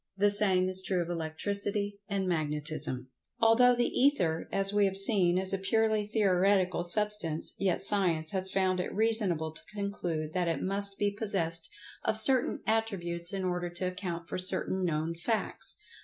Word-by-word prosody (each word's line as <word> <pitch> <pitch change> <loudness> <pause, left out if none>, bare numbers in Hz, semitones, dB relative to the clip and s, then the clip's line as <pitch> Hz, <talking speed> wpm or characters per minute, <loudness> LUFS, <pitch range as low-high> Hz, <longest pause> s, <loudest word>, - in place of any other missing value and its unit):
The 205 +1 +4
same 190 -3 +4
is 185 0 +6
true 185 -2 -1
of 170 - -10
Electricity 200 +5 -1
and 195 -2 -2
Magnetism. 150 -5 -1 0.3
Although 245 +2 +4
the 240 0 +1
Ether, 180 - 0
as 195 0 +4
we 205 -1 +3
have 195 0 -2
seen, 195 -4 +4
is 190 +1 +1
a 195 - -1
purely 215 +1 0
theoretical 190 -4 +1
substance, 205 -4 0
yet 190 -1 0
Science 175 -6 0
has 190 -1 -2
found 185 -1 0
it 180 - -4
reasonable 205 -8 +1
to - - -7
conclude 175 -6 -4
that 180 -2 -1
it 165 -4 -1
must 200 +1 0
be 205 0 0
possessed 180 -6 -2 0.3
of 220 - 0
certain 255 +2 +3
attributes 175 -6 -2
in 195 -2 -4
order 180 -1 -3
to 175 +1 -3
account 180 -2 -5
for - - -5
certain 185 +1 0
known 160 -1 -2
facts. 175 +7 -3
190 Hz, 165 wpm, -29 LUFS, 170-205 Hz, 0.3 s, is